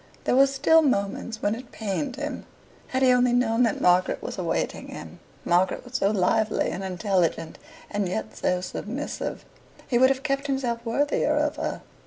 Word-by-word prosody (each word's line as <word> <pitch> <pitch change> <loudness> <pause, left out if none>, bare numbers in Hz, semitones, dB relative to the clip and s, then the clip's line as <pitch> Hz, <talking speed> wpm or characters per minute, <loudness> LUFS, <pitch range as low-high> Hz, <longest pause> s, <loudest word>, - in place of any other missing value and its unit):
There - - +1
were 275 +1 +6
still 275 +4 +4
moments 220 -4 -1
when 205 - +2
it 245 +2 -8
pained 225 +5 -3
him. 295 +2 -5 0.4
Had 260 0 -1
he 255 - +6
only 250 -1 +3
known 240 -1 +2
that 230 -4 +2
Margaret 180 +1 +3
was - - -6
awaiting - - -2
him - - -9 0.3
Margaret, 190 +8 +1
so 195 - +2
lively 215 +2 +1
and 190 - -5
intelligent, 180 -4 -1 0.3
and 205 -3 -2
yet 110 -7 -4
so 180 0 0
submissive 245 +9 -5 0.4
he 240 - +2
would 260 +1 +6
have 270 0 -1
kept 275 -1 -1
himself 250 -4 -1
worthier 285 +5 +1
of - - 0
her. - - -3
235 Hz, 170 wpm, -25 LUFS, 195-265 Hz, 0.4 s, were